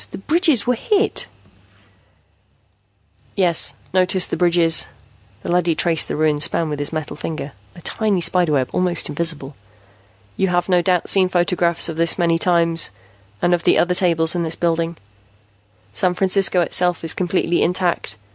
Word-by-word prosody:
The -, -, -8 dB
bridges 310 Hz, -, +1 dB
were 250 Hz, -, +1 dB
hit 410 Hz, -, -1 dB, 1.2 s
" -, -, -40 dB
"Yes, 170 Hz, -2 st, +2 dB, 0.2 s
notice 185 Hz, 0 st, +2 dB
the -, -, -4 dB
bridges." 170 Hz, -2 st, +2 dB, 0.6 s
The -, -, -4 dB
leady 175 Hz, -2 st, +1 dB
traced 165 Hz, -1 st, 0 dB
the -, -, -4 dB
ruined 150 Hz, -1 st, 0 dB
span 160 Hz, +1 st, +1 dB
with 150 Hz, -1 st, -4 dB
his 145 Hz, -, -1 dB
metal 155 Hz, -2 st, -5 dB
finger, 150 Hz, -1 st, -6 dB, 0.2 s
a 175 Hz, -, -13 dB
tiny 210 Hz, +1 st, -1 dB
spider 175 Hz, -2 st, +1 dB
web, 130 Hz, -3 st, -1 dB
almost 180 Hz, -2 st, +1 dB
invisible. 150 Hz, -3 st, -2 dB, 0.8 s
"You 190 Hz, -, +1 dB
have 175 Hz, -1 st, -1 dB
no 180 Hz, -2 st, +2 dB
doubt 180 Hz, -1 st, 0 dB
seen 190 Hz, -2 st, +3 dB
photographs 175 Hz, -1 st, +1 dB
of 165 Hz, -2 st, -6 dB
this 165 Hz, 0 st, +2 dB
many 170 Hz, -2 st, +1 dB
times, 170 Hz, -2 st, +2 dB, 0.5 s
and 175 Hz, -, +2 dB
of 175 Hz, -, 0 dB
the -, -, +3 dB
other 180 Hz, +1 st, +1 dB
tables 170 Hz, -3 st, +1 dB
in 175 Hz, -, -2 dB
this 165 Hz, -1 st, -2 dB
building. 165 Hz, -1 st, -2 dB, 1.0 s
"San 180 Hz, -, +1 dB
Francisco 190 Hz, -1 st, +2 dB
itself 175 Hz, 0 st, 0 dB
is 165 Hz, -, 0 dB
completely 175 Hz, -1 st, -1 dB
intact. 175 Hz, -, -1 dB
175 Hz, 160 wpm, -19 LUFS, 165-180 Hz, 1.2 s, seen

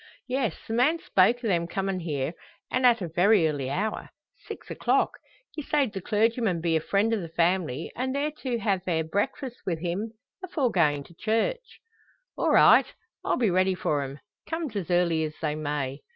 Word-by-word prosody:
"Yes; 255 Hz, -2 st, -1 dB
the 225 Hz, -, -3 dB
man 260 Hz, +8 st, +3 dB
spoke 235 Hz, -, +2 dB
o' -, -, +1 dB
them 170 Hz, -4 st, +1 dB
comin' 195 Hz, +1 st, -2 dB
here, 150 Hz, -3 st, -2 dB, 0.4 s
an' 255 Hz, 0 st, +1 dB
at 235 Hz, -5 st, +5 dB
a -, -, -2 dB
very 180 Hz, +2 st, +4 dB
early 140 Hz, -4 st, -2 dB
hour. 210 Hz, +9 st, -2 dB, 0.4 s
Six -, -, -8 dB
o'clock. -, -, +1 dB, 0.3 s
He 305 Hz, -, -5 dB
sayed 285 Hz, -6 st, 0 dB
the 195 Hz, -, -4 dB
clergyman 220 Hz, -2 st, +1 dB
be 165 Hz, 0 st, 0 dB
a 160 Hz, -, +2 dB
friend 205 Hz, +6 st, +1 dB
o' 220 Hz, -, 0 dB
the 165 Hz, -, -7 dB
family, 165 Hz, -3 st, 0 dB
and 260 Hz, +2 st, -2 dB
they're 290 Hz, +2 st, 0 dB
to 250 Hz, -3 st, -1 dB
ha' 200 Hz, -5 st, 0 dB
their 165 Hz, -3 st, 0 dB
breakfasts 205 Hz, -, -3 dB
wi' 180 Hz, -, -1 dB
him, 180 Hz, +7 st, -3 dB, 0.3 s
afore 295 Hz, -9 st, 0 dB
goin' 150 Hz, -5 st, +2 dB
to 170 Hz, -, -17 dB
church." 230 Hz, -, -2 dB, 0.5 s
"All -, -, 0 dB
right! -, -, +6 dB, 0.4 s
I'll -, -, 0 dB
be 230 Hz, -6 st, +2 dB
ready 185 Hz, +1 st, +2 dB
for 150 Hz, -5 st, 0 dB
'em, 135 Hz, 0 st, -6 dB, 0.3 s
come's 325 Hz, -8 st, -3 dB
as 190 Hz, -5 st, -3 dB
early 175 Hz, -2 st, +2 dB
as 155 Hz, 0 st, -4 dB
they 155 Hz, -2 st, -1 dB
may." 145 Hz, -3 st, -3 dB
190 Hz, 190 wpm, -27 LUFS, 165-235 Hz, 0.5 s, right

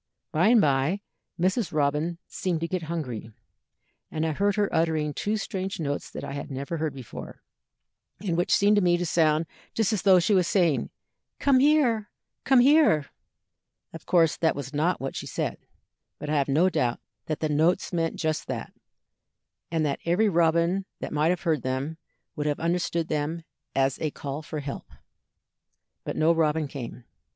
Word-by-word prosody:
"By 170 Hz, +6 st, +3 dB
and 235 Hz, +1 st, +6 dB
by 145 Hz, +4 st, +2 dB, 0.4 s
Mrs. 185 Hz, +2 st, +1 dB
Robin 150 Hz, +3 st, 0 dB
seemed 180 Hz, -4 st, -2 dB
to 165 Hz, -, -1 dB
get 185 Hz, 0 st, -2 dB
hungry, 125 Hz, -10 st, -4 dB, 0.8 s
and 160 Hz, 0 st, -2 dB
I 160 Hz, -, 0 dB
heard 200 Hz, +5 st, +1 dB
her 205 Hz, -1 st, +2 dB
uttering 160 Hz, -2 st, +1 dB
two 210 Hz, +7 st, -1 dB
strange 190 Hz, -3 st, -4 dB
notes 145 Hz, -3 st, -3 dB
that -, -, -7 dB
I -, -, -5 dB
had 140 Hz, -, -5 dB
never 140 Hz, +4 st, -4 dB
heard 155 Hz, -2 st, -2 dB
before, 130 Hz, -4 st, -9 dB, 0.8 s
and 185 Hz, -5 st, -2 dB
which 175 Hz, +1 st, 0 dB
seemed 205 Hz, +1 st, +4 dB
to -, -, +4 dB
me 175 Hz, -1 st, +3 dB
to 175 Hz, -, -2 dB
sound 160 Hz, -1 st, +2 dB, 0.3 s
just 225 Hz, -1 st, +1 dB
as 210 Hz, -, 0 dB
though 190 Hz, -2 st, +6 dB
she 180 Hz, +4 st, +2 dB
was 185 Hz, -3 st, +3 dB
saying, 170 Hz, -7 st, +2 dB, 0.5 s
'Come 275 Hz, -2 st, +4 dB
here! 260 Hz, -7 st, +3 dB, 0.4 s
come 265 Hz, -2 st, +6 dB
here!' 275 Hz, -, +4 dB, 0.8 s
Of 165 Hz, -, -10 dB
course 165 Hz, -4 st, +3 dB
that 160 Hz, -, +2 dB
was 140 Hz, -1 st, -6 dB
not 160 Hz, +5 st, +1 dB
what 135 Hz, 0 st, -4 dB
she -, -, -5 dB
said, -, -, -3 dB, 0.6 s
but 150 Hz, -, -5 dB
I -, -, +1 dB
have 140 Hz, -2 st, +2 dB
no 155 Hz, +6 st, +3 dB
doubt 125 Hz, -9 st, 0 dB, 0.3 s
that 155 Hz, -, -2 dB
the 155 Hz, -, 0 dB
notes 160 Hz, +5 st, +1 dB
meant 165 Hz, -1 st, 0 dB
just 155 Hz, -1 st, -2 dB
that, -, -, -5 dB, 1.0 s
and 160 Hz, -2 st, 0 dB
that 140 Hz, -2 st, -1 dB
every 185 Hz, +6 st, +2 dB
robin 170 Hz, +2 st, +2 dB
that -, -, -5 dB
might 150 Hz, +2 st, +2 dB
have 180 Hz, 0 st, 0 dB
heard 160 Hz, -6 st, +1 dB
them 135 Hz, +6 st, -3 dB, 0.4 s
would 150 Hz, -1 st, -2 dB
have 145 Hz, -, -1 dB
understood 170 Hz, -1 st, 0 dB
them 155 Hz, +2 st, -2 dB, 0.3 s
as 135 Hz, 0 st, +1 dB
a 155 Hz, -, 0 dB
call 140 Hz, +1 st, -6 dB
for 150 Hz, -1 st, -5 dB
help. 140 Hz, -1 st, -7 dB, 1.1 s
But -, -, -4 dB
no 160 Hz, +2 st, +4 dB
robin 160 Hz, -2 st, +1 dB
came. 125 Hz, -3 st, -7 dB
165 Hz, 180 wpm, -26 LUFS, 150-185 Hz, 1.1 s, and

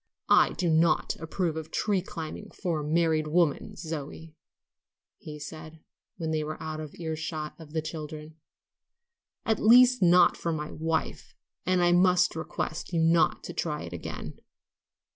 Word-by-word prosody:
"I -, -, +5 dB
do 175 Hz, +1 st, -1 dB
not 160 Hz, 0 st, +2 dB
approve 165 Hz, 0 st, -2 dB
of 160 Hz, -1 st, -6 dB
tree 205 Hz, -3 st, 0 dB
climbing 175 Hz, +2 st, -7 dB
for 170 Hz, -5 st, -1 dB
a -, -, -4 dB
married 160 Hz, 0 st, +1 dB
woman, 160 Hz, -1 st, +1 dB
Zoe," 160 Hz, 0 st, -7 dB, 0.8 s
he 150 Hz, -1 st, -8 dB
said, 155 Hz, +1 st, -9 dB, 0.4 s
when 160 Hz, -1 st, -3 dB
they 155 Hz, -1 st, 0 dB
were 155 Hz, +1 st, -5 dB
out 155 Hz, -1 st, -5 dB
of 155 Hz, -2 st, -8 dB
ear 160 Hz, -2 st, -4 dB
shot 155 Hz, -1 st, -5 dB
of 155 Hz, -2 st, -12 dB
the 160 Hz, -1 st, -1 dB
children; 155 Hz, 0 st, -7 dB, 1.1 s
"at 220 Hz, -1 st, +1 dB
least, 250 Hz, +2 st, +6 dB
not 175 Hz, 0 st, +6 dB
for 170 Hz, -, -3 dB
my 150 Hz, -1 st, -4 dB
wife; 160 Hz, +1 st, -3 dB, 0.3 s
and 185 Hz, -1 st, +3 dB
I 175 Hz, -, +4 dB
must 180 Hz, 0 st, +4 dB
request 160 Hz, 0 st, -4 dB
you 170 Hz, -, 0 dB
not 165 Hz, -1 st, +3 dB
to 175 Hz, -, -7 dB
try 155 Hz, -3 st, -3 dB
it 85 Hz, -, -8 dB
again." 85 Hz, -, -7 dB
160 Hz, 160 wpm, -28 LUFS, 155-175 Hz, 1.1 s, least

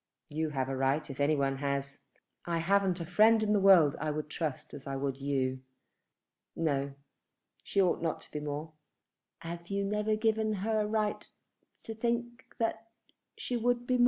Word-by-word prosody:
"You 155 Hz, +1 st, -1 dB
have 135 Hz, -3 st, -1 dB
a 135 Hz, -, -2 dB
right 135 Hz, +3 st, +1 dB
if 135 Hz, -, -10 dB
any 145 Hz, +2 st, +3 dB
one 135 Hz, -1 st, 0 dB
has. 140 Hz, 0 st, -2 dB, 0.5 s
I 170 Hz, -1 st, 0 dB
haven't 190 Hz, +1 st, +2 dB
a 170 Hz, -, -4 dB
friend 215 Hz, +5 st, +5 dB
in 210 Hz, 0 st, +2 dB
the 205 Hz, -, +4 dB
world 185 Hz, -7 st, +6 dB
I 155 Hz, -, -1 dB
would 150 Hz, 0 st, -3 dB
trust 155 Hz, -5 st, -4 dB
as 140 Hz, -1 st, -9 dB
I 135 Hz, -, -3 dB
would 135 Hz, 0 st, -2 dB
you. 135 Hz, -2 st, -1 dB, 0.9 s
No; 140 Hz, -3 st, -1 dB, 0.7 s
she -, -, -1 dB
ought 185 Hz, -3 st, +3 dB
not 165 Hz, -1 st, -1 dB
to -, -, -12 dB
be 150 Hz, -, -3 dB
more." 150 Hz, +2 st, -4 dB, 0.7 s
"Have 170 Hz, +1 st, -6 dB
you 200 Hz, +1 st, -1 dB
never 210 Hz, +1 st, +1 dB
given 220 Hz, 0 st, +1 dB
her 220 Hz, -1 st, +2 dB
a 210 Hz, -, 0 dB
right 215 Hz, -1 st, -1 dB, 0.5 s
to 225 Hz, -, -5 dB
think 235 Hz, +1 st, -2 dB
that 225 Hz, -1 st, -1 dB, 0.5 s
she 250 Hz, -, -3 dB
would 245 Hz, +1 st, +1 dB
be 255 Hz, -, 0 dB
more?" 250 Hz, -, +2 dB
170 Hz, 185 wpm, -31 LUFS, 140-215 Hz, 0.9 s, world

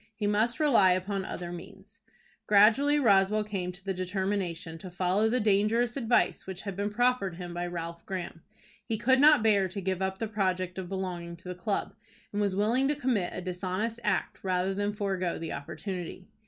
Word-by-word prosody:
He 210 Hz, -, -3 dB
must 220 Hz, +6 st, +1 dB
rely 230 Hz, -12 st, +5 dB
upon 190 Hz, +1 st, -2 dB
other 175 Hz, -1 st, -5 dB
means. 175 Hz, -1 st, -11 dB, 0.5 s
Gradually 230 Hz, +9 st, +5 dB
Roswell 210 Hz, -3 st, +4 dB
came 195 Hz, -4 st, -3 dB
to 180 Hz, +2 st, -14 dB
the 195 Hz, -, -1 dB
determination 185 Hz, -3 st, -3 dB
to 185 Hz, -, -8 dB
follow 185 Hz, +4 st, +1 dB
the 250 Hz, +3 st, +1 dB
dangerous 220 Hz, +3 st, +2 dB
advice 240 Hz, -6 st, +1 dB
which 190 Hz, -1 st, -6 dB
had 200 Hz, -3 st, -5 dB
been 200 Hz, +2 st, -1 dB
proffered 235 Hz, -4 st, +1 dB
him 175 Hz, 0 st, -7 dB
by 175 Hz, 0 st, -3 dB
Ralph 170 Hz, -1 st, -6 dB
Graham. 175 Hz, -3 st, -5 dB, 0.4 s
He 225 Hz, -, -2 dB
could 260 Hz, +5 st, +3 dB
not 295 Hz, -5 st, +7 dB
bear 200 Hz, -3 st, +4 dB
to 190 Hz, +2 st, -6 dB
give 190 Hz, -1 st, -2 dB
up 190 Hz, 0 st, -1 dB
the 225 Hz, -, -2 dB
project 185 Hz, -3 st, -1 dB
of 180 Hz, -2 st, -6 dB
belonging 180 Hz, -3 st, -4 dB
to 180 Hz, +2 st, -11 dB
the -, -, -3 dB
club, 195 Hz, +3 st, -2 dB, 0.4 s
and 205 Hz, -, 0 dB
was 200 Hz, -2 st, +1 dB
willing 230 Hz, +7 st, +2 dB
to 295 Hz, -, +1 dB
commit 245 Hz, -10 st, 0 dB
a -, -, -4 dB
dishonest 185 Hz, +5 st, -3 dB
act -, -, -1 dB
rather 185 Hz, 0 st, 0 dB
than 205 Hz, +1 st, -1 dB
forego 190 Hz, -4 st, -2 dB
the 165 Hz, -1 st, -5 dB
opportunity. 180 Hz, +4 st, -6 dB
195 Hz, 190 wpm, -29 LUFS, 180-215 Hz, 0.5 s, not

